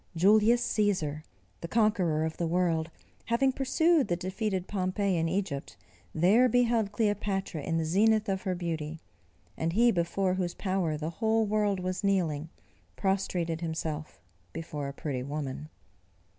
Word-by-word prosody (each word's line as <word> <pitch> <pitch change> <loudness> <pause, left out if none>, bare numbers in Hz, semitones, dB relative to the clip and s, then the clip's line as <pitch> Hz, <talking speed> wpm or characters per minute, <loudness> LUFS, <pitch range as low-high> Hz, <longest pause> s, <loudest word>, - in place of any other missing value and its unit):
Julius 215 +7 +4
Cæsar, 180 -8 0 0.4
the 170 - -6
conqueror 180 -7 +2
of 160 - -4
the 170 - -1
world, 170 -2 +1 0.4
having 250 +4 +2
pursued 285 +3 +2
the 175 - +1
defeated 190 +1 -3
Pompey 195 0 0
into 165 -1 0
Egypt, 185 -7 -3 0.3
there 205 +10 +4
beheld 235 -3 +2
Cleopatra 200 -6 -1
in 165 +3 -1
the 165 - 0
zenith 215 +6 +3
of 190 -1 -1
her 185 -2 -2
beauty; 165 -2 -4 0.6
and 165 +1 -2
he 235 +4 +5
before 185 +1 0
whose 180 -2 -2
power 185 -5 -1
the 155 +2 -4
whole 220 0 +3
world 205 -2 +1
was 185 +2 -3
kneeling, 165 -6 0 0.5
prostrated 180 -4 -1
himself 160 -2 -4 0.3
before 150 -3 -5
a 140 - -6
pretty 135 -3 -4
woman. 145 +1 -5
185 Hz, 145 wpm, -29 LUFS, 160-210 Hz, 0.6 s, he